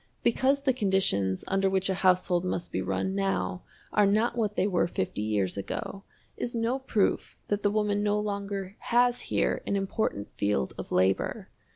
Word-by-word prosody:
Because 270 +4 +2
the 265 -2 +3
conditions 190 - +1
under 195 0 +2
which 190 0 0
a 190 - +1
household 185 -1 +2
must 180 -1 -3
be 95 - -1
run 95 0 -1
now 95 -2 -1 0.3
are 210 -1 +5
not 215 +4 +2
what 215 -3 -1
they 185 - +2
were 185 -5 +2
fifty 105 - -3
years 105 -3 0
ago 195 - -5 0.3
is 240 0 -3
no 235 +3 0
proof 225 -6 0
that 205 0 0
the 205 - +3
woman 205 -1 +1
no 210 0 +1
longer 200 -2 -4
has 245 0 +2
here - - +1
an - - +1
important 195 - -2
field 100 -11 0
of - - -8
labor. 95 +1 +1
195 Hz, 175 wpm, -28 LUFS, -, 0.3 s, are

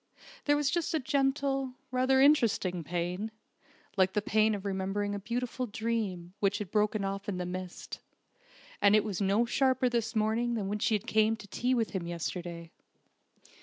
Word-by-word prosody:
There 290 - +4
was 290 -1 +1
just 340 -2 0
a - - +2
gentle, 270 -1 0 0.2
rather 260 +1 +3
interesting 230 - +3
pain, 175 +6 -2 0.7
like 190 0 +3
the 210 - +1
pain 215 0 +3
of 200 0 -7
remembering 200 +1 -1
a 205 - -3
beautiful 245 +4 -3
dream 210 -5 -3
which 200 -1 +2
had 205 -4 -6
broken 210 -1 +1
off 195 +1 -3
in 190 - -2
the 180 - -2
midst; 180 0 -6 0.8
and 200 +1 +6
it 215 - +4
was 205 -2 -3
no 200 +4 +3
sharper 260 +1 +2
this 235 -1 -1
morning 225 +2 +1
than 200 -3 -2
when 210 +1 -2
she 220 0 +2
came 220 +1 +2
to 210 - -12
tea 250 +5 0
with 230 -3 0
him 180 -3 -3
yesterday. 170 0 -5
215 Hz, 170 wpm, -30 LUFS, 190-245 Hz, 0.8 s, and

